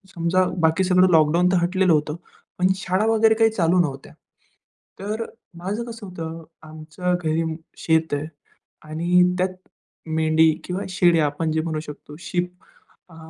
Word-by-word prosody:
समजा 170 +2 +2 0.2
बाकी 165 +2 +2
सगळं 185 0 +4
लॉकडाऊन 165 +2 +4
तर 185 - +3
हटलेलं 185 0 +2
होतं, 150 0 0 0.4
पण 180 - +4
शाळा 190 +2 -1
वगैरे 225 0 +4
काही 225 0 +4
चालू 180 -3 +2
नव्हत्या. 140 -5 -2 0.9
तर 210 +3 -3 0.3
माझं 200 +6 -3
कसं 230 -2 -9
होतं? 165 -2 -7 0.2
आमचं 155 +3 -3
घरी 160 +1 +1
अं, 160 -1 -3 0.2
शेत 160 -1 +1
आहे 145 +1 -3 0.6
आणि 170 +3 +2 0.2
त्यात 185 0 -1 0.5
मेंढी 160 0 +3
किंवा 185 +2 -3
शेळ्या, 175 -4 +3
आपण 150 +2 -2
जे 160 0 0
म्हणू 160 -1 -3
शकतो 150 -1 -10
शीप, 180 0 -2 0.6
अ, 165 - -15
170 Hz, 150 wpm, -22 LUFS, 160-185 Hz, 0.9 s, सगळं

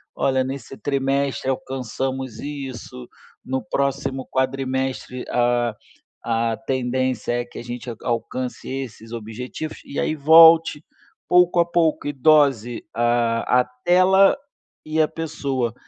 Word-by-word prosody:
Olha, 130 -1 +1
nesse 135 0 -7
trimestre 140 -1 -1
alcançamos 130 0 -3
isso. 135 - -7 0.4
No 130 0 -2
próximo 135 +2 -2
quadrimestre, 130 -1 -2
a 120 -2 +1 0.5
a 115 0 0
tendência 130 -2 -1
é 120 - -7
que - - -13
a - - -7
gente 120 +1 -7
alcance 125 +1 -3
esses 130 -4 -6
objetivos”, 120 +7 -6
e 140 - -5
aí - - 0
volte, 160 +1 +6 0.4
pouco 180 0 +4
a 170 - +5
pouco, 165 -4 +1
e 145 - -2
dose 135 -5 +3
a 120 +1 +2
a - - -4 0.2
tela 185 +2 +5 0.5
e 155 +1 +1
a 155 - +3
pessoa. 140 -7 -3
130 Hz, 120 wpm, -22 LUFS, 120-145 Hz, 0.5 s, volte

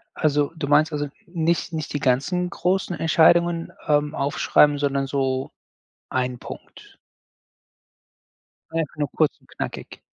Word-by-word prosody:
Also, 145 -1 +1
du 160 -3 -3
meinst 150 +3 +4
also, 145 -1 -2 0.2
nich 170 -1 -1
nicht 155 -3 -4
die 145 - -2
ganzen 145 +8 +1
großen 180 0 -1
Entscheidungen, 165 +1 +3
ähm, 150 0 +2
aufschreiben, 145 +1 +3
sondern 140 -1 0
so 135 -1 -1 0.6
ein 125 -1 -1
Punkt? - - -12 1.8
Einfach 165 -3 -2
nur 145 -3 -2
kurz 155 -2 +1
und - - -27
knackig. - - -7
150 Hz, 125 wpm, -23 LUFS, 140-165 Hz, 1.8 s, meinst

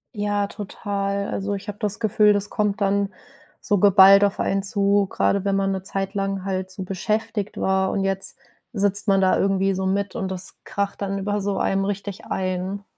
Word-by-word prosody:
Ja, 205 -1 -1
total. 200 -1 -4
Also, 200 +1 -3
ich 200 +1 -6
habe 205 0 -6
das 210 -2 -2
Gefühl, 210 -1 +4
das 205 0 0
kommt 210 0 -1
dann 200 0 +1 0.5
so 205 - +1
geballt 195 0 +7
auf 200 0 +1
einen 195 0 0
zu, 200 0 +2
grade 200 -1 +1
wenn 200 -1 0
man 195 0 +1
'ne 190 -1 -3
Zeit 195 0 -3
lang 195 -1 -2
halt 190 -1 -3
so 185 0 -6
beschäftigt 210 +2 -3
war. 190 0 +1
Und 195 - -1
jetzt 195 0 -1 0.4
sitzt 200 0 +3
man 195 -1 +4
da 190 - +3
irgendwie 195 0 +1
so 190 0 -2
mit 200 +1 -1
und 190 - -3
das 185 0 -5
kracht 200 0 -3
dann 195 0 -2
über 205 +1 -2
so 200 0 -2
einem 195 0 0
richtig 200 0 -5
ein. 185 +2 -3
195 Hz, 195 wpm, -23 LUFS, 195-205 Hz, 0.5 s, geballt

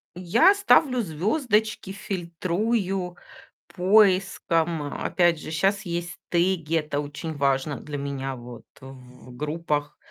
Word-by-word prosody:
Я 185 - +4
ставлю 305 -10 +4
звёздочки, 210 - 0
фильтрую 185 +1 -2 0.5
поиском. 185 -4 +2 0.2
Опять 175 -3 +2
же, 155 - -8
щас 195 +6 +1
есть 170 -1 -4
теги, 170 -2 +1
это 150 -2 -1
очень 150 +2 -5
важно 140 0 0
для 150 -1 -6
меня 135 -1 -4
вот 120 -1 -11 0.2
в 125 -1 -13
группах. 150 0 -3
170 Hz, 105 wpm, -25 LUFS, 145-195 Hz, 0.5 s, Я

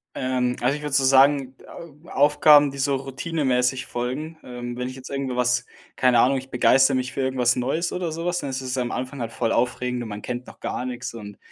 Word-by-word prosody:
Ähm, 125 -1 -1
also 130 +3 +2
ich 150 - -7
würde 150 -2 -5
so 140 -1 +4
sagen, 135 0 +4 0.5
Au - - -14
Aufgaben, 145 0 +5
die 140 - -10
so 140 0 +1
routinemäßig 130 -2 -1
folgen, 140 +7 -4
ähm, 120 -1 -7
wenn 125 +1 -3
ich 130 - -7
jetzt 130 -1 -10
irgendwo 135 -2 -3
was 125 0 +1 0.3
keine 125 -2 +3
Ahnung, 135 +3 +4
ich 130 0 -7
begeistere 135 +2 +4
mich 125 0 -2
für 135 - -2
irgendwas 125 -2 +2
Neues 150 +8 -1
oder 180 -3 -3
sowas. 175 +2 -2
Dann 140 - -4
ist 130 0 -3
es 130 0 -4
am 125 -1 -1
Anfang 130 +2 -5
halt 115 0 -4
voll 115 -1 -1
aufregend 125 0 -1
und 115 - -6
man 105 0 -6
kennt 125 0 -5
noch - - -13
gar 125 - -4
nix 125 -1 -5
und, 105 -3 -9
130 Hz, 225 wpm, -23 LUFS, 125-140 Hz, 0.5 s, Aufgaben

